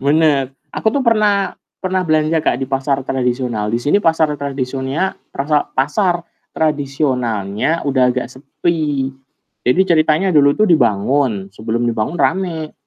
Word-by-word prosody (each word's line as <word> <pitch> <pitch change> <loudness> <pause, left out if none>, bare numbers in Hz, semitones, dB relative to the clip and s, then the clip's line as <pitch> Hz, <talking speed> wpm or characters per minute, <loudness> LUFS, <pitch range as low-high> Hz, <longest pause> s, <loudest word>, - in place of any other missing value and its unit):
Benar. 145 -1 +2 0.2
Aku - - 0
tuh 265 +4 0
pernah 210 -4 +2 0.2
pernah 185 0 -1
belanja 155 -1 +1
Kak, 135 - +1
di 135 - -3
pasar 135 +1 -1
tradisional. 125 -4 -1
Di 115 - 0
sini 145 +11 +1
pasar 160 -4 +2
tradisonnya 135 +5 -2 0.2
trasa 145 +1 0
pasar 175 +5 +1 0.3
tradisonalnya 135 -4 -1
udah 130 -3 +3
agak 125 0 -1
sepi. 145 0 -2 0.5
Jadi 125 +9 +2
ceritanya 160 +2 +2
dulu 145 -2 +4
itu 215 - +4
dibangun, 120 - +1
sebelum 110 +3 -2
dibangun 120 +6 -1
rame, 170 -5 -1
140 Hz, 130 wpm, -17 LUFS, 125-165 Hz, 0.5 s, dulu